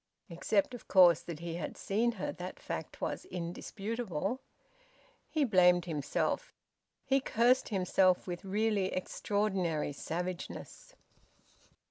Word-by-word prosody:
(Except, 200 +7 +1
of 245 - -9
course, 180 -4 +7
that 165 -2 -7
he 170 -1 -4
had 175 - -5
seen 230 +4 +1
her 195 - -3
that 180 +1 -7
fact - - -6
was - - -2
indisputable.) 195 - -3 0.9
He 310 -2 +1
blamed 180 -7 +5
himself. 150 -5 -2 0.5
He 270 0 +3
cursed 250 0 +3
himself 185 -2 +3
with 175 -2 -5
really 205 0 +1
extraordinary 185 -6 -1
savageness. 180 - -5
190 Hz, 110 wpm, -32 LUFS, 175-220 Hz, 0.9 s, course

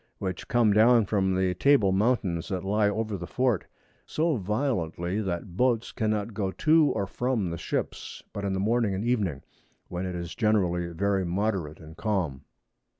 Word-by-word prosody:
E. - - -39
which 95 -2 -4
come 120 -5 +3
down 115 +1 +5
from 95 -2 +1
the 95 -1 +1
Table 110 -1 +4
Mountains 95 -5 +1
that 95 -2 -3
lie 105 +1 +2
over 110 0 -2
the 85 -1 -7
Fort, 125 -4 0 0.4
so 160 0 +1
violently, 100 - -1
that 90 -2 -4
Boats 120 +1 +1
cannot 110 -1 -1
go 100 -2 -1
to 155 +10 +4
or 100 -2 0
from 115 -3 -1
the 85 - -4
Ships, - - -4
but 100 - -5
in 100 -1 -1
the 95 - -1
Morning 110 0 +1
and 100 +4 -3
Evening, 100 - 0 0.5
when 90 +1 -3
it 90 - -4
is 85 0 -5
generally 95 -6 +1
very 95 +3 0
moderate 90 -3 -2
and 80 0 -12
calm. 85 -11 -2
100 Hz, 175 wpm, -27 LUFS, 90-110 Hz, 0.5 s, down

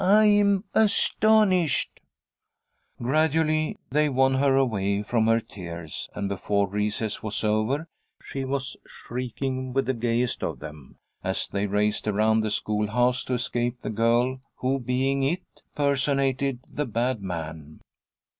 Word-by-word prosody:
I'm 205 0 +5
astonished!" 210 -6 +3 1.0
Gradually 155 +4 +1
they 150 +2 +3
won 135 0 +3
her 135 0 +3
away 100 -6 +1
from 110 0 +1
her 115 0 +4
tears, 85 - -7
and 100 -1 -2
before 100 +1 0
recess 105 +2 -2
was 110 0 -3
over 110 +9 0 0.4
she 135 - -5
was 135 0 -3
shrieking 130 +1 -4
with 135 +1 +1
the 130 - 0
gayest 120 0 0
of - - -2
them 75 -3 -11 0.3
as - - -1
they 100 +1 -1
raced 105 +2 0
around 110 +1 +3
the 110 - -1
schoolhouse 110 +4 +1
to 130 - -2
escape 120 0 -2
the - - -4
girl 120 +4 +1
who, 135 +2 0
being 130 +2 0
"It," 170 +7 0 0.3
personated 140 -2 +1
the 150 -1 -3
"bad 120 0 -1
man." 80 -4 -6
125 Hz, 130 wpm, -26 LUFS, 105-140 Hz, 1.0 s, I'm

